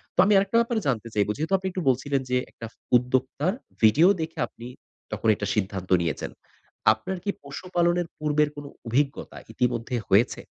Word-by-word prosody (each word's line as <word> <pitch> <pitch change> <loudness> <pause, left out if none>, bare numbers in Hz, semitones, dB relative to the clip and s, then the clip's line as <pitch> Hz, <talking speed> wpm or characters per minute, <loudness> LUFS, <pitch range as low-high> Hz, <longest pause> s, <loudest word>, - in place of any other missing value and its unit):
তো - - -6
আমি 210 - +4
আরেকটা 200 +4 +2
ব্যাপার 235 0 -1
জানতে 120 -4 -1
চাইবো, 105 0 +1
যেহেতু 160 +6 -2
আপনি 190 0 -4
একটু 185 - -3
বলছিলেন 135 +2 +1
যে, 125 - +2
একটা 115 - -8 0.3
উদ্যোক্তার 130 +7 0 0.3
ভিডিও 135 +11 +6
দেখে 160 +1 -5
আপনি 120 - -11 0.5
তখন - - -2
একটা 105 - -4
সিদ্ধান্ত 95 -3 -2
নিয়েছেন। 80 -4 -3 0.6
আপনার 110 +13 -5
কি 200 - -3
পশুপালনের 175 +3 -1
পূর্বের 150 0 +1
কোন 145 0 -8 0.2
অভিজ্ঞতা 135 +4 -1 0.2
ইতিমধ্যে 125 0 -1
হয়েছে? 100 +5 +3
140 Hz, 160 wpm, -25 LUFS, 115-170 Hz, 0.6 s, ভিডিও